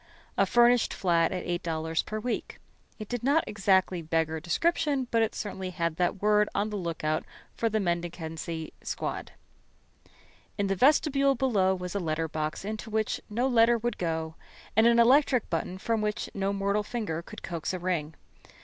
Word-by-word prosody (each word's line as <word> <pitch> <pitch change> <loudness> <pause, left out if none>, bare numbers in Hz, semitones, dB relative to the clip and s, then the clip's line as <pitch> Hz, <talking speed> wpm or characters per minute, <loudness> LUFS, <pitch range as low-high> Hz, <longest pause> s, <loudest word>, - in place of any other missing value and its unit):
A - - +3
furnished 240 0 +4
flat 170 -3 +2
at 185 -1 -3
$8 165 -2 -2
per 215 - -3
week. 245 +2 -3 0.4
It 215 - -7
did 245 0 -3
not 285 +6 +3
exactly 190 -3 +2
beggar 160 0 0
description, 280 - 0
but 230 - +3
it 225 - 0
certainly 190 -3 -4
had 170 -3 -2
that 180 +2 0
word 210 0 +4
on 210 +1 0
the - - -3
lookout 165 -4 -2 0.3
for 230 - 0
the 220 0 0
mendicancy 170 -3 -3
squad. - - -4 1.2
In 200 - +1
the 195 0 0
vestibule 275 - +4
below 205 -7 +2
was 180 -1 -5
a 200 - -1
letter 165 -2 -1
box 155 +3 -3
into 215 +1 -5
which 220 0 -1
no 240 +5 0
letter 235 -1 +5
would 240 +1 -3
go, 160 -2 -2 0.4
and 220 +2 +6
an 235 0 +5
electric 250 0 +4
button 175 +2 -2
from 225 +3 -1
which 210 0 -2
no 195 0 -1
mortal 200 +1 0
finger 210 -7 -3
could - - -11
coax 165 -3 -3
a 185 - -3
ring. 170 -4 -2
195 Hz, 170 wpm, -28 LUFS, 170-230 Hz, 1.2 s, and